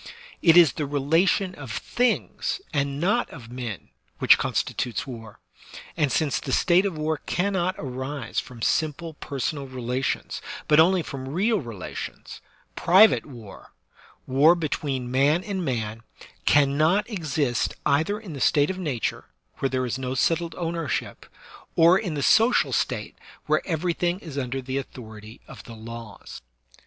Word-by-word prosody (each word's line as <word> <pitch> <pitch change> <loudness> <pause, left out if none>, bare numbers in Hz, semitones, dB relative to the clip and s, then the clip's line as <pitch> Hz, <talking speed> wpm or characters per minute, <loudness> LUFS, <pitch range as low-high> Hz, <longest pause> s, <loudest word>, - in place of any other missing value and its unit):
It 165 0 +6
is 165 -7 +7
the 150 - -3
relation 165 +7 +2
of 140 -7 -9
things 245 - -1
and 140 -1 -1
not 210 +9 +1
of 120 -6 -11
men 120 -6 -6 0.3
which - - +6
constitutes 120 -3 -2
war; 115 -5 -9 0.6
and 150 -5 +1
since 145 +1 +1
the 135 - -5
state 185 +7 +4
of 175 -5 -5
war 155 0 -1
cannot 185 0 0
arise 130 -2 -4
from 120 -3 -8
simple 160 +1 0
personal 140 -1 -4
relations, 130 0 -3 0.3
but 150 0 +5
only 180 +2 +5
from 130 -2 -7
real 205 +8 +1
relations, 115 - -7 0.3
private 190 +3 +5
war 115 -8 -12 0.3
— - - -24
war 145 +6 +5
between 140 -6 -3
man 145 +7 +3
and 195 -3 -3
man 115 -6 -3 0.2
— - - -25
cannot 155 +8 +3
exist 150 - -1
either 175 +9 +1
in 200 -7 -9
the 140 - -7
state 145 +5 +3
of 190 - -7
nature, 145 -10 -2 0.3
where 135 - 0
there 130 -1 -1
is 125 +2 -3
no 130 0 -3
settled 165 +4 0
ownership, 165 -3 -3 0.5
or 170 +2 +6
in 180 -8 -4
the 140 - -2
social 230 +3 +4
state - - -1 0.3
where - - +2
everything 175 +1 0
is 160 -7 -10
under 135 -1 -3
the 130 +1 -2
authority 110 -4 -10
of - - -11
the 115 - -10
laws. 115 -1 -9
145 Hz, 150 wpm, -25 LUFS, 130-175 Hz, 0.6 s, is